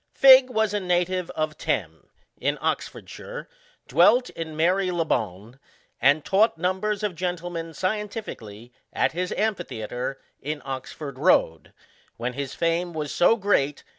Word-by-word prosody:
Figg 260 -1 +8
was 220 -3 0
a 205 - +1
native 180 -1 0
of 155 -1 -1
Thame, - - -3 0.3
in - - -1
Oxford - - -3
shire, - - -8 0.4
dwelt 250 +1 +4
in 160 -2 -6
Mary 185 +4 +2
le 170 -2 0
bonne, 110 - -3 0.4
and 145 +2 +4
taught 205 0 +3
numbers 190 +4 -1
of 210 -3 -1
gentlemen 175 -1 -4
scientifically, 185 - -5 0.2
at - - +1
his 180 +2 -3
amphitheatre, 135 - -3 0.2
in 150 +2 -4
Oxford 135 +1 -6
road,* 80 - +2 0.5
when 125 +2 -3
his 140 0 -5
feme 170 +1 0
was 150 -3 -4
so 200 +6 +4
great. 165 -10 0
170 Hz, 135 wpm, -25 LUFS, 140-195 Hz, 0.5 s, Figg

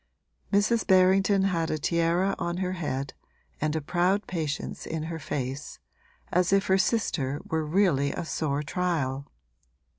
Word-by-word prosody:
Mrs. 215 +3 +2
Berrington 190 +1 +4
had 170 -4 0
a 155 - 0
tiara 170 +5 +1
on 170 0 -2
her 185 0 -1
head 140 -6 -3 0.5
and 155 +1 0
a 160 - -1
proud 180 +6 +1
patience 155 -5 -4
in 160 -1 -3
her 165 0 -5
face, 135 -1 -4 0.5
as 180 +1 +2
if 195 0 +3
her 190 - +3
sister 155 - 0
were 160 0 -1
really 155 -4 +2
a - - -4
sore 150 -2 -1
trial. 140 -4 -2
170 Hz, 145 wpm, -27 LUFS, 150-190 Hz, 0.5 s, Berrington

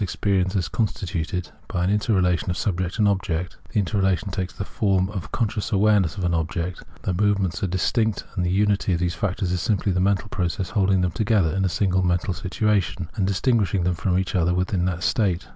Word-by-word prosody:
experience 95 -1 0
as 90 -5 0
constituted 90 -2 -2 0.2
by 90 -5 -1
an 90 - +2
interrelation 95 -5 +1
of 90 - 0
subjecfc 90 -1 -2
and 105 -2 +3
object. 90 -3 -1 0.2
The - - -2
interrelation 95 0 +1
takes 95 -1 -3
the 100 - -5
form 95 -3 +1
of 95 -4 -6
con 115 - +1
scious 105 +3 -4
awareness 100 -5 +3
of 95 - -3
an 90 -1 +1
object. 85 +2 -2 0.2
The 95 - 0
moments 100 -2 +1
are 100 - +1
dis 95 0 0
tinct, 110 -3 0
and 90 - 0
the 90 - 0
unity 100 0 +2
of 85 - 0
these 90 -1 0
factors 90 +1 -2
is 90 -1 0
simply 105 -2 +1
the 90 - 0
mental 100 +2 +1
process 90 0 -2
of - - -13
holding 95 -3 +3
them 90 -1 +1
together 100 -3 +1
in 95 0 +1
a - - +2
single 95 0 +1
mental 90 +1 +1
situation 90 -4 -1
and 95 -3 0
distinguishing 100 -2 +1
them 90 +1 +1
from 90 +1 0
each 95 -1 -1
other 90 -1 +2
within 90 0 0
that 90 -2 -2
state. 95 -4 +1
95 Hz, 215 wpm, -24 LUFS, 90-100 Hz, 0.2 s, and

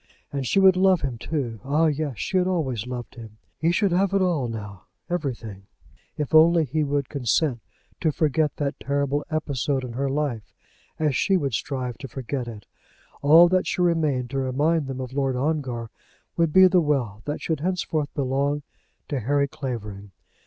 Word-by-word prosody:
And 135 -2 -2
she 195 - +3
would 190 -1 +6
love 185 -2 +4
him 130 -5 -3
too. 125 -8 -3
Ah, 150 +4 +2
yes; 150 -5 -1
she 190 - -1
had 180 0 +2
always 130 - -1
loved 125 -2 -6
him! 110 -3 -11 0.2
He 165 +2 +2
should 195 +2 +2
have 190 +2 +2
it 195 - +3
all 165 -9 +1
now, 105 -4 -7 0.3
everything, 115 - -4 0.5
if 150 -1 -3
only 165 +1 +6
he 155 +3 -1
would 140 -2 -1
consent 130 0 0 0.4
to 160 - +1
forget 150 0 +1
that 140 -1 -3
terrible 140 +1 -1
episode 140 -4 -1
in 125 -2 -6
her 135 +3 -1
life, 135 -6 -3 0.4
as 150 -4 +1
she 195 +8 +3
would 140 -7 -2
strive 125 +1 -3
to 135 - -7
forget 130 0 -4
it. 110 -3 -9 0.6
All 160 +5 +8
that 185 0 +1
should 180 - 0
remain 155 -7 +1
to 135 - -2
remind 145 +4 +1
them 135 -1 -5
of 130 -1 -6
Lord 135 -2 0
Ongar 130 -5 -2 0.4
would 165 -2 +2
be 190 +4 +8
the 185 -1 +5
wealth 125 -9 -1
that 150 - -3
should 160 -3 -2
henceforth 160 -4 -1
belong 140 +2 0 0.4
to 140 - -2
Harry 140 +4 +1
Clavering. 105 -8 -6
140 Hz, 180 wpm, -24 LUFS, 125-160 Hz, 0.6 s, All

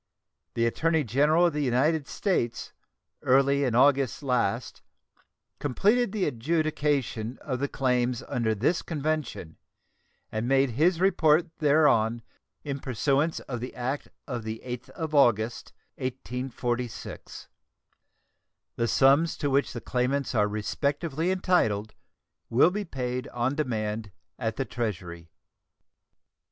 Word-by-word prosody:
The 115 - +2
Attorney 160 +6 +1
General 145 +8 +3
of 170 - +2
the 150 - -1
United 140 +3 +1
States 120 - -2 0.5
early 140 +2 +3
in 125 -4 0
August 135 +1 +3
last 120 -3 -1 0.8
completed 205 - +2
the 205 -3 0
adjudication 145 -4 -1
of 130 -4 -4
the 140 - 0
claims 125 -3 0
under 110 -2 0
this 145 - +1
convention, 150 - -3 0.7
and 110 +2 -2
made 135 0 +3
his 165 +8 +2
report 170 -3 +3
thereon 140 -7 +3 0.4
in 140 -2 -4
pursuance 140 +6 0
of 125 -3 -5
the 125 +2 -6
act 130 +4 -3 0.2
of 125 -4 -3
the 110 0 -6
8th 125 0 -6
of 160 -2 -5
August, 120 -5 +2 0.3
1846. 125 -2 -4 1.3
The 115 - +1
sums 140 +7 +4
to 145 -2 -1
which 140 +1 +2
the 120 - -6
claimants 130 +3 -1
are 105 -3 +3
respectively 140 - -1
entitled 115 - +1 0.6
will 130 +9 +5
be 205 +2 -3
paid 125 -4 -3
on 120 +2 -1
demand 110 -7 -2 0.3
at 110 -1 -2
the 135 - -2
Treasury. 90 -9 -5
135 Hz, 120 wpm, -27 LUFS, 120-150 Hz, 1.3 s, will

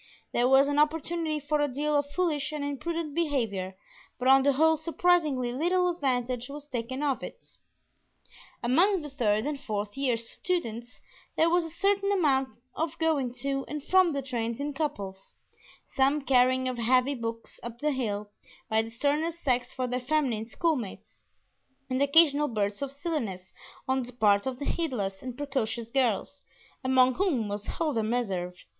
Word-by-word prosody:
There 240 +1 +3
was 270 +1 +6
an 290 0 +1
opportunity 315 +1 0
for 295 +1 0
a 290 - +2
deal 295 +3 -1
of 285 0 +1
foolish 310 -3 -1
and 300 -1 -4
imprudent 305 +2 -3
behavior, 230 - -1 0.4
but 250 - -2
on 270 +1 +7
the 280 +1 +3
whole 320 +4 +4
surprisingly 315 -6 +1
little 355 +6 +2
advantage 255 -6 -1
was 290 +1 -7
taken 260 0 -4
of 280 -3 0
it. - - -9 1.2
Among 340 +9 +3
the 295 - -8
third 215 -5 +1
and 295 -1 -2
fourth 210 -6 -4
year 265 -4 +1
students 235 -1 -4 0.3
there 330 +1 +4
was 350 -1 +3
a - - -6
certain 395 +3 +1
amount 275 -9 +2 0.2
of 325 -1 -3
going 305 -6 +1
to 275 -1 -1
and 300 -1 -5
from 370 0 +4
the 275 -1 -2
trains 235 -2 -3
in 290 +1 -3
couples; 200 -11 -4 0.6
some 275 +2 +2
carrying 255 0 +3
of 250 -1 -3
heavy 255 +4 +3
books 230 -2 -5
up 235 0 -7
the 300 +4 0
hill 210 -6 -3 0.4
by 220 0 +4
the 225 - -6
sterner 290 +7 0
sex 255 -7 -1
for 255 - -2
their 250 0 -1
feminine 255 -5 0
schoolmates, 255 - -3 0.7
and 255 +1 0
occasional 295 0 +5
bursts 205 -3 -2
of 280 -1 -3
silliness 250 - -4 0.3
on 260 0 +1
the 250 0 -7
part 205 -2 +3
of 260 -1 -3
heedless 250 - -2
and 250 -1 -7
precocious 240 -5 -2
girls, 265 +2 0 0.4
among 260 0 +4
whom 285 - 0
was 205 +1 -5
Huldah 300 -9 0
Meserve. 195 -6 -2
270 Hz, 165 wpm, -28 LUFS, 235-300 Hz, 1.2 s, on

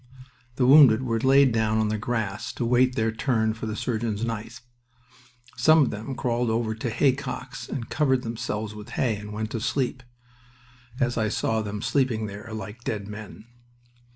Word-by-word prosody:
The 125 - +2
wounded 130 -3 +7
were 115 -3 0
laid 135 +1 +5
down 110 -1 +1
on 110 -1 +1
the 110 - -1
grass 110 -3 -3
to 120 - -3
wait 125 +1 +3
their 110 0 +1
turn 110 -2 0
for 110 0 -6
the 110 - -3
surgeon's 110 -2 -2
knife. 115 +1 -5 0.9
Some 155 +5 +5
of - - 0
them 110 +6 -5
crawled 120 -1 0
over 110 0 0
to 110 +2 -4
haycocks 130 +1 -1
and 120 -4 -4
covered 130 -4 +1
themselves 110 -2 -4
with 105 -1 -10
hay 115 -4 +1
and 105 +1 -8
went 110 +1 -4
to 115 - -2
sleep, 125 +2 -1 1.0
as 120 -3 +1
I 110 -1 +1
saw 110 +1 0
them 105 0 -5
sleeping 130 -6 +1
there, 105 +2 -8
like 110 +2 -7
dead 100 -4 -3
men. 105 0 -9
115 Hz, 175 wpm, -25 LUFS, 110-125 Hz, 1.0 s, wounded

